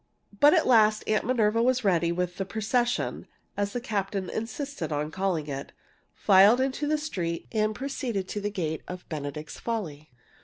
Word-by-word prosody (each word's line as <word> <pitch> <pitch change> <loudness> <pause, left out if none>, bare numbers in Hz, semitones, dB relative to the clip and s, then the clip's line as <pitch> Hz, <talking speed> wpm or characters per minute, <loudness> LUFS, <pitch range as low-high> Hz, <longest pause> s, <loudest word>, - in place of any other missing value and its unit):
But 290 +1 +7
at - - +3
last 215 -3 +4
Aunt 215 0 +1
Minerva 230 -2 +2
was 255 +1 +2
ready, 175 -4 +2
and 170 - -2
the 180 +1 -2
"procession" 235 +5 -1 0.3
(as 205 0 -2
the 245 - -1
captain 200 -5 -3
insisted 225 - -4
on 150 +1 -2
calling 185 -4 -1
it) 140 -2 -6 0.4
filed 200 +4 +6
into 270 +3 -1
the 305 +1 +2
street 175 - -3
and 215 -1 0
proceeded 245 -7 -3
to 205 - -3
the 205 - -1
gate 160 -6 -3
of 180 0 -8
"Benedict's 150 0 -6
Folly." 160 -11 -4
205 Hz, 165 wpm, -27 LUFS, 170-240 Hz, 0.4 s, But